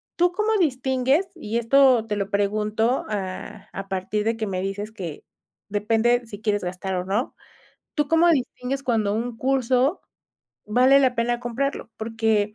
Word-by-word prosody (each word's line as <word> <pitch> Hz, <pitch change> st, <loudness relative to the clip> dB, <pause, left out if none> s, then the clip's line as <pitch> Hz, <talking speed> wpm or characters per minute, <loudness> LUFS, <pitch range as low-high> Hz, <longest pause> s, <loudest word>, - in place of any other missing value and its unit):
¿tú 355 Hz, +1 st, +3 dB
cómo 430 Hz, +3 st, +1 dB
distingues? 265 Hz, +1 st, +1 dB
Y 230 Hz, -9 st, -3 dB
esto 250 Hz, -1 st, +5 dB
te 210 Hz, -, -1 dB
lo 200 Hz, -1 st, -2 dB
pregunto 215 Hz, +4 st, 0 dB
a 205 Hz, +1 st, -5 dB
a 195 Hz, 0 st, -6 dB
partir 195 Hz, +2 st, -2 dB
de 225 Hz, +1 st, +1 dB
que 220 Hz, -, -2 dB
me 185 Hz, -2 st, -2 dB
dices 205 Hz, +2 st, -4 dB
que 175 Hz, -8 st, -7 dB, 0.5 s
depende 225 Hz, +4 st, +1 dB
si 215 Hz, -2 st, -10 dB
quieres 205 Hz, -2 st, 0 dB
gastar 185 Hz, +1 st, -3 dB
o 180 Hz, 0 st, -2 dB
no, 210 Hz, +7 st, -1 dB, 0.6 s
¿tú 295 Hz, -2 st, 0 dB
cómo 330 Hz, +2 st, +4 dB
distingues 260 Hz, -1 st, -1 dB
cuando 220 Hz, -6 st, +1 dB
un 230 Hz, +1 st, -3 dB
curso, 260 Hz, +4 st, +1 dB, 0.6 s
vale 255 Hz, +6 st, +5 dB
la 260 Hz, -2 st, +3 dB
pena 240 Hz, +1 st, 0 dB
comprarlo? 245 Hz, 0 st, -3 dB
Porque 220 Hz, -2 st, 0 dB
225 Hz, 160 wpm, -24 LUFS, 205-260 Hz, 0.6 s, esto